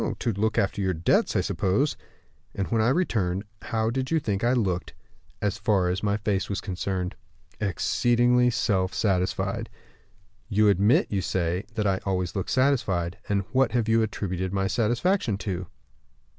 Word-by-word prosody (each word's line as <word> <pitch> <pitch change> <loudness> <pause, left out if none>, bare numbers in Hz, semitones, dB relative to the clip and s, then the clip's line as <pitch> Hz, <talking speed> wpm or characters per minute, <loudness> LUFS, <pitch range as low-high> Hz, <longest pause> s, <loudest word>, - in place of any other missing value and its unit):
"To 115 - -1
look 110 +3 0
after 100 +1 +1
your 95 -2 0
debts, 80 +2 +2
I - - +3
suppose." 105 +11 0 0.6
"And 100 - -2
when 115 -1 +2
I 110 - +3
returned, 105 - 0 0.2
how 110 -1 -1
did 130 +1 -2
you 165 - +2
think 105 -7 -2
I 120 +2 +3
looked, 95 -8 -1 0.5
as 105 -2 0
far 100 -4 +2
as 90 +2 -1
my 105 -1 +1
face 105 -3 -1
was 100 -1 -2
concerned?" 95 -1 -3 0.5
"Exceedingly 120 +5 +2
self 100 -5 0
satisfied." 95 -3 0 0.8
"You 105 -1 +4
admit, 100 +4 +3
you 100 -2 0
say, 90 +1 -1
that 105 - 0
I 95 -1 +1
always 90 -2 -2
look 95 - -2
satisfied. 110 -10 +1
And 100 -1 +1
what 130 -2 +2
have 120 -3 +1
you 115 0 +4
attributed 95 -4 -2
my 95 0 0
satisfaction 120 - +1
to?" 95 -3 -3
100 Hz, 160 wpm, -26 LUFS, 95-115 Hz, 0.8 s, You